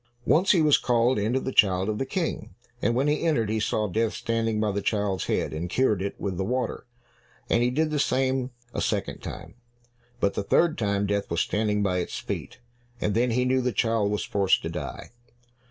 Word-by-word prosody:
Once 185 Hz, +5 st, +3 dB
he 170 Hz, -5 st, +4 dB
was 150 Hz, -2 st, +5 dB
called 120 Hz, -1 st, +2 dB
in 105 Hz, +3 st, 0 dB
to 130 Hz, -, +2 dB
the 130 Hz, -, -4 dB
child 95 Hz, -5 st, +3 dB
of 110 Hz, -1 st, -2 dB
the 135 Hz, -, -2 dB
King, 170 Hz, +3 st, -3 dB, 0.3 s
and 120 Hz, -, +1 dB
when 135 Hz, +4 st, +2 dB
he 150 Hz, +1 st, +1 dB
entered, 120 Hz, -11 st, +1 dB
he 110 Hz, -, 0 dB
saw 105 Hz, 0 st, 0 dB
death 110 Hz, +3 st, 0 dB
standing 115 Hz, -1 st, -1 dB
by 105 Hz, -1 st, +1 dB
the 100 Hz, +1 st, -2 dB
child's 100 Hz, -2 st, -1 dB
head -, -, -1 dB
and 85 Hz, +3 st, -4 dB
cured 110 Hz, -3 st, +1 dB
it 100 Hz, -, -4 dB
with 95 Hz, -3 st, -3 dB
the 95 Hz, -, -1 dB
water, 125 Hz, +4 st, -2 dB, 0.6 s
and 115 Hz, -, +4 dB
he 120 Hz, -, +3 dB
did 155 Hz, +5 st, 0 dB
the 150 Hz, -, 0 dB
same 130 Hz, -1 st, +1 dB, 0.2 s
a -, -, -2 dB
second -, -, -2 dB
time, -, -, -8 dB, 0.7 s
but 100 Hz, -3 st, +1 dB
the -, -, -2 dB
third 160 Hz, +11 st, +2 dB
time 100 Hz, -2 st, 0 dB
Death 100 Hz, 0 st, -1 dB
was 85 Hz, 0 st, 0 dB
standing 105 Hz, 0 st, 0 dB
by 90 Hz, -2 st, +1 dB
its 90 Hz, -, -4 dB
feet, -, -, -5 dB, 0.4 s
and 105 Hz, -, 0 dB
then 120 Hz, +4 st, +2 dB
he 125 Hz, +2 st, +1 dB
knew 130 Hz, +1 st, +2 dB
the 125 Hz, 0 st, 0 dB
child 115 Hz, -3 st, +1 dB
was 105 Hz, 0 st, -1 dB
forced 100 Hz, -2 st, +2 dB
to 80 Hz, -, -3 dB
die. 75 Hz, -7 st, -6 dB
110 Hz, 220 wpm, -26 LUFS, 100-130 Hz, 0.7 s, was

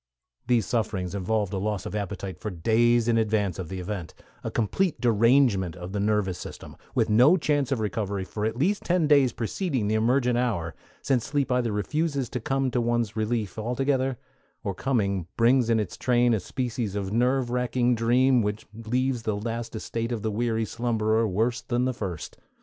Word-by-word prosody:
These 120 Hz, -4 st, +3 dB
sufferings 105 Hz, -6 st, -2 dB
involve 100 Hz, +1 st, -1 dB
a 95 Hz, -, -1 dB
loss 105 Hz, -1 st, -2 dB
of -, -, -5 dB
appetite 100 Hz, -3 st, -4 dB
for 105 Hz, -, -4 dB
days 115 Hz, +6 st, +2 dB
in 115 Hz, -1 st, +3 dB
advance 105 Hz, -4 st, 0 dB
of 90 Hz, -, -5 dB
the 95 Hz, 0 st, -5 dB
event; 90 Hz, -2 st, -5 dB, 0.3 s
a -, -, -2 dB
complete 145 Hz, -, 0 dB
derangement 115 Hz, -, +3 dB
of 90 Hz, +1 st, -7 dB
the 100 Hz, -, -2 dB
nervous 100 Hz, -3 st, 0 dB
system, -, -, -9 dB, 0.2 s
with -, -, +2 dB
no 125 Hz, -, +6 dB
chance 145 Hz, -4 st, 0 dB
of 135 Hz, -, +1 dB
recovery 100 Hz, -2 st, -2 dB
for 105 Hz, +3 st, -5 dB
at 110 Hz, +2 st, -1 dB
least 190 Hz, +10 st, +1 dB
ten 175 Hz, -2 st, +2 dB
days 140 Hz, -4 st, +5 dB
preceding 125 Hz, -, -2 dB
the 105 Hz, -, 0 dB
emergent 120 Hz, +2 st, +2 dB
hour, 100 Hz, -10 st, -1 dB, 0.3 s
since 130 Hz, -4 st, +1 dB
sleep 140 Hz, -2 st, -1 dB
either 125 Hz, -2 st, +1 dB
refuses 140 Hz, +4 st, -1 dB
to 125 Hz, -, -3 dB
come 135 Hz, +2 st, 0 dB
to 120 Hz, -, +1 dB
one's 120 Hz, -2 st, 0 dB
relief 110 Hz, -2 st, -2 dB
altogether, 130 Hz, +3 st, 0 dB, 0.5 s
or 100 Hz, -, -2 dB
coming 100 Hz, -5 st, -1 dB
brings 120 Hz, +1 st, +4 dB
in 115 Hz, -1 st, +3 dB
its 100 Hz, -5 st, -4 dB
train 120 Hz, -1 st, +3 dB
a 110 Hz, -, +1 dB
species 115 Hz, -1 st, -3 dB
of 100 Hz, -1 st, -3 dB
nerve 125 Hz, +1 st, +1 dB
racking 125 Hz, 0 st, +1 dB
dream 120 Hz, +2 st, +3 dB
which 105 Hz, 0 st, -3 dB
leaves 120 Hz, +3 st, -1 dB
the 110 Hz, -2 st, -2 dB
last 115 Hz, +2 st, -4 dB
estate 115 Hz, +2 st, -3 dB
of 115 Hz, -3 st, -3 dB
the 110 Hz, -, 0 dB
weary 115 Hz, +1 st, 0 dB
slumberer 115 Hz, -1 st, 0 dB
worse 115 Hz, +5 st, 0 dB
than 120 Hz, +1 st, -1 dB
the 130 Hz, -, 0 dB
first. 95 Hz, -9 st, -6 dB
115 Hz, 185 wpm, -26 LUFS, 105-125 Hz, 0.5 s, no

